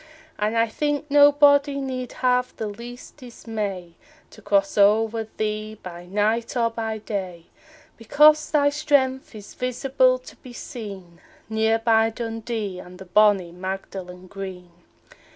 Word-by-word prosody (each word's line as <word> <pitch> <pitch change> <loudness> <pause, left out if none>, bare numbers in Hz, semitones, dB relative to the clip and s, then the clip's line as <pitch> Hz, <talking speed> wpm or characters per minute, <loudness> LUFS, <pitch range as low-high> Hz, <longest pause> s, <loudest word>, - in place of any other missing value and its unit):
And 215 +2 0
I 230 0 +3
think 295 +5 -2
nobody 285 0 +5
need 255 -2 -5
have 250 0 +1
the 220 - -3
least 235 +6 -9
dismay 215 - -6 0.4
To 215 - -15
cross 195 -1 +1
o'er 220 +2 +3
thee 215 0 -3
by 175 -1 -9
night 215 +5 0
or 230 -1 +1
by 225 -1 -3
day, 185 -5 -5 0.5
Because 300 +6 +4
thy 285 -2 +3
strength 280 -4 0
is 205 -1 -11
visible 255 +1 +1
to 255 - -14
be 250 - -13
seen 195 -9 -9 0.3
Near 220 0 +2
by 225 0 +3
Dundee 225 -4 -5
and 180 0 -12
the 190 - -11
bonnie 195 -2 +3
Magdalen 185 0 -7
Green. 185 -2 -8
225 Hz, 135 wpm, -23 LUFS, 195-255 Hz, 0.5 s, nobody